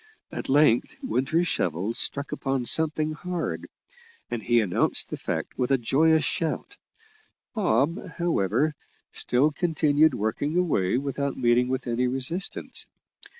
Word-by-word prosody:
At - - -6
length 135 -4 +3
Winter's 135 +9 +1
shovel 90 - -1
struck 140 +4 -3
upon 135 -2 -2
something 155 +2 +2
hard, 175 +2 -4 0.6
and 120 - -2
he 120 +1 +3
announced 100 -6 0
the - - -1
fact - - -4
with 125 - +1
a 135 - +4
joyous 155 +6 +3
shout. 165 - -2 0.8
Bob, 170 - +1
however, 155 - +1 0.4
still 135 +5 +2
continued 155 -3 +2
working 120 +10 -1
away 125 - +1
without 140 0 -2
meeting 120 0 +3
with 130 0 -2
any 125 +1 0
resistance. 135 +9 -2
140 Hz, 125 wpm, -26 LUFS, 120-160 Hz, 0.8 s, a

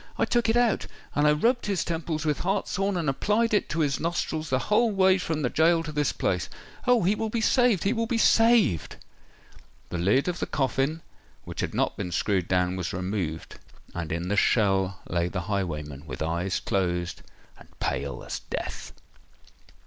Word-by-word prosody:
I - - +2
took 240 -2 +1
it 225 - +3
out—and 215 -10 0
I - - +6
rubbed 235 +12 +1
his 200 -3 0
temples 160 -1 -3
with 150 -2 0
hartshorn 195 0 -1
and 165 -3 -2
applied 210 +12 +1
it 210 - +2
to 165 - -1
his 140 -3 +1
nostrils 160 -2 -2
the 130 - +2
whole 215 - +2
way 190 -2 +4
from 160 -4 -2
the 125 - +1
goal 165 +1 +3
to 155 - -5
this 150 -1 0
place! - - -1 0.4
Oh! 245 -4 +4
he 190 +4 +3
will 220 +1 -2
be 230 - -1
saved—he 220 - +3
will 230 -1 -1
be 235 - 0
saved!" 225 - +4 0.9
The 85 - -3
lid 105 - +2
of 175 -1 -2
the - - -2
coffin, 140 +3 -1 0.4
which - - -9
had - - -3
not - - 0
been 90 - -4
screwed 95 +1 0
down, 90 0 +1
was 90 -2 -3
removed; 90 -3 -4 0.3
and 85 -2 -4
in 85 +2 -2
the 100 - 0
shell 95 -3 +2
lay 85 -1 0
the 90 +1 -3
highwayman—with 80 -7 -4
eyes 85 +4 -1
closed—and 90 -2 -4
pale - - -3
as - - -5
death! - - -5
150 Hz, 175 wpm, -26 LUFS, -, 0.9 s, I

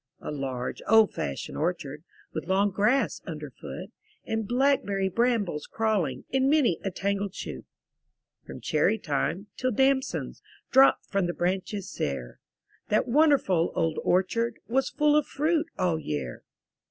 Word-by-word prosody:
A - - -6
large, 130 -4 -4
old 220 -1 +6
fashioned 70 - -4
orchard. 155 -3 -2 0.3
With - - -4
long 195 +2 +2
grass 210 +8 +1
under - - -6
foot. - - -8 0.3
And 220 -1 -2
blackberry 245 -7 +2
brambles 215 -8 0
crawling 195 - -1
In 265 0 +2
many 280 - +3
a 195 - 0
tangled 200 +1 -2
shoot. - - -6 0.8
From - - -9
cherry 220 - +2
time, 165 +2 -2
till 255 - 0
damsons 265 +3 0 0.3
Dropped 265 +1 +6
from 195 -3 0
the 175 - -3
branches 190 +2 -2
sere, 60 -3 -4 0.5
That 215 - +2
wonderful 260 - +3
old 165 -2 0
orchard 210 +6 +1
Was 265 +3 +1
full 300 -1 +3
of 300 -1 +3
fruit 310 +3 0
all 175 -4 +1
year! 70 - -4
200 Hz, 140 wpm, -27 LUFS, 170-255 Hz, 0.8 s, old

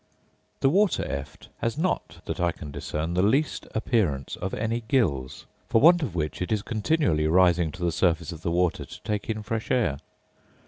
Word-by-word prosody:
The 135 - +5
water 200 +3 +2
eft 70 +1 -6
has 115 +4 -1
not, 180 +3 -2
that - - -4
I 85 -1 +2
can 75 -3 -9
discern, 75 +3 -3
the 90 - +2
least 135 +10 +1
appearance 100 - 0
of 95 - -4
any 115 +2 -1
gills; 75 - 0 0.2
for 115 - +4
want 170 +5 +6
of 110 - -3
which 75 -4 -2
it 90 - -2
is 105 -2 +1
continually 110 - +1
rising 85 -1 +4
to 90 - -7
the 85 - +2
surface 85 0 +1
of 80 -2 -9
the 85 - -1
water 90 0 +1
to - - -11
take 105 0 -3
in 110 -1 -2
fresh 110 +1 -3
air. 85 - +1
95 Hz, 190 wpm, -26 LUFS, 80-115 Hz, 0.2 s, want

